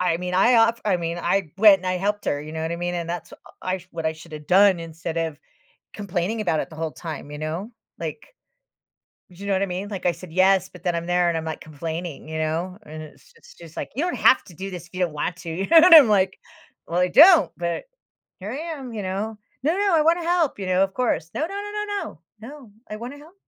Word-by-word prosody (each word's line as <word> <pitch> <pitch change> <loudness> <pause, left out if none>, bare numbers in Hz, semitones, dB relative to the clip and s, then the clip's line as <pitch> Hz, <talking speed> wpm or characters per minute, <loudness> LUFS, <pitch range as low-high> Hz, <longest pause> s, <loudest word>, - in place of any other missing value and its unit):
I 180 -2 +1
mean, 180 +1 -5
I 215 +7 +5
off 230 +1 +3
I 200 -4 +2
mean, 170 0 -3
I 185 -2 0
went, 205 -2 +8
and 185 - -8
I 185 0 0
helped 205 +2 -1
her, 145 - -1
you 155 +1 -9
know 160 0 -4
what 160 +1 -2
I - - -3
mean, 175 +1 -3
and 170 -1 -4
that's 175 0 -5
uh - - -11 0.3
I 185 -1 -3
what 165 -1 -4
I 160 - +1
should 160 +1 -14
have 150 -1 -9
done 190 -1 +5
instead 165 0 -6
of 160 -3 -3 0.6
complaining 200 +2 -2
about 160 -6 0
it - - -5
the 160 - -11
whole 160 -1 -3
time, 155 -4 -7
you 150 - -7
know? 165 +9 -4 0.3
Like, - - -7 1.0
do 180 - -18
you 200 +3 -9
know 200 - +1
what 190 - +1
I 200 - +2
mean? 185 +3 -4
Like, 195 -4 -6
I - - +4
said, 170 0 -12
"Yes," 185 0 +3
but 180 - -15
then 175 -1 0
I'm 170 - -3
there, 175 0 +2
and 165 - -1
I'm, 160 - -4
like, 160 - -5
complaining, 160 +1 -6
you 160 0 -4
know, 165 +4 -2
and 155 -5 -9
it's 155 - -16
it's - - -17
just 165 -2 -14
like, - - -5
"You 290 - 0
don't 360 - -2
have 260 - +5
to 175 - -15
do 195 +4 -6
this 175 -2 -8
if - - -32
you 185 - -4
don't 175 -4 0
want 150 +4 -2
to," - - -4
you 190 +4 -3
know, 335 - +6
and 340 +2 +8
I'm 275 -8 +9
like, 190 -2 +2 0.5
"Well, 170 +1 -1
I 180 0 +2
don't," 300 - +7
but 170 0 -3 0.6
here 200 +3 -6
I 265 - -4 0.2
am, 255 -4 -8
you 215 - -4
know? 205 +4 -3 0.3
"No, 315 +4 +2
no, 400 -4 +2
I 310 - +4
wanna 335 +2 +2
help," 335 - +1
you 190 - -4
know, 185 +1 +3
of 195 0 -2
course. 170 -9 -1
"No, - - -3
no, 320 - 0
no, - - -7 0.5
no, - - -5 0.3
no 225 +3 -9
no, 280 -7 -13 0.2
I 215 - -5
wanna 245 +6 -8
help." 305 +4 -16
185 Hz, 270 wpm, -23 LUFS, 165-215 Hz, 1.0 s, I'm